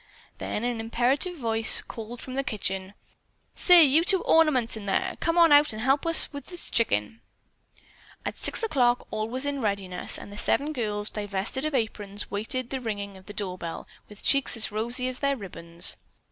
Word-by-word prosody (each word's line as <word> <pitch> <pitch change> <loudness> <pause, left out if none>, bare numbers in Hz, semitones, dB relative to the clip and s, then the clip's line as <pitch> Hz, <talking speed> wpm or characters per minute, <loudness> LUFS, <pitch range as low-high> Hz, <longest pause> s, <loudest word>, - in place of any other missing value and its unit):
Then 210 - -4
an 240 -1 -2
imperative 250 +10 0
voice 225 -4 +3
called 230 +1 -9
from 255 - -8
the 275 +1 -1
kitchen: 195 -4 -4 0.6
"Say, 355 -2 +7
you 300 +3 +4
two 380 0 +1
ornaments 290 -9 +3
in 210 -2 -8
there, 195 - -1
come 330 +1 0
on 335 -2 +6
out 290 -3 +5
and 215 - -6
help 270 +4 +2
with 330 0 +2
this 330 +5 -8
chicken." 110 - 0 1.0
At - - -3
six - - +1
o'clock 250 - +1
all 215 0 -3
was 260 +3 +4
in 285 -1 -2
readiness, 200 -4 -1
and 205 - -11
the 205 - -2
seven 295 +2 +1
girls, 210 -5 -2
divested 205 +6 -3
of 310 -2 -2
aprons, 210 -4 -3
waited 230 +5 -2
the 265 -1 -3
ringing 205 -4 -5
of 190 +1 -16
the 205 - -8
door 190 -3 -4
bell 165 -1 -7 0.2
with 210 -1 -11
cheeks 275 -3 +3
as 220 - -3
rosy 240 +4 -1
as 255 0 -3
their 280 -1 0
ribbons. 170 -4 +1
230 Hz, 185 wpm, -26 LUFS, 205-275 Hz, 1.0 s, Say